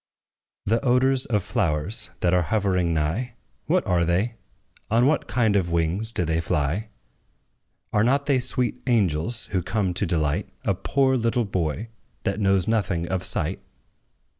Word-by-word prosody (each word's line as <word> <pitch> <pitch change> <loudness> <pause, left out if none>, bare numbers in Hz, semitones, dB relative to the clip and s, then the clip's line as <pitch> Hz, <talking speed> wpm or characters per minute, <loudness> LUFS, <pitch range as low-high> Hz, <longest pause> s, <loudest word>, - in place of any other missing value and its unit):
The 115 +5 +1
odors 130 +1 +4
of 105 -5 0
flowers, 90 -2 -2
that 85 - +2
are 90 - +4
hovering 90 -1 0
nigh 85 +11 -1 0.3
What - - +2
are 85 -1 +2
they? 90 +8 0 0.6
on 115 +3 +3
what 150 +3 +1
kind 110 -4 +1
of 90 -4 +1
wings 85 +7 0
do 105 -6 -1
they 80 +1 0
fly? 80 +6 -1 1.1
Are 105 - +3
not 140 +4 +2
they 140 -3 +2
sweet 125 0 -1
angels, 110 -1 0
who 95 -1 +1
come 95 0 -1
to 95 +2 -1
delight 80 +2 0
A 100 - +1
poor 130 +7 +1
little 115 0 0
boy, 95 +3 -2 0.3
that 100 +2 -1
knows 95 -2 +2
nothing 95 -6 0
of 95 -1 -1
sight? - - -1
100 Hz, 155 wpm, -24 LUFS, 85-115 Hz, 1.1 s, odors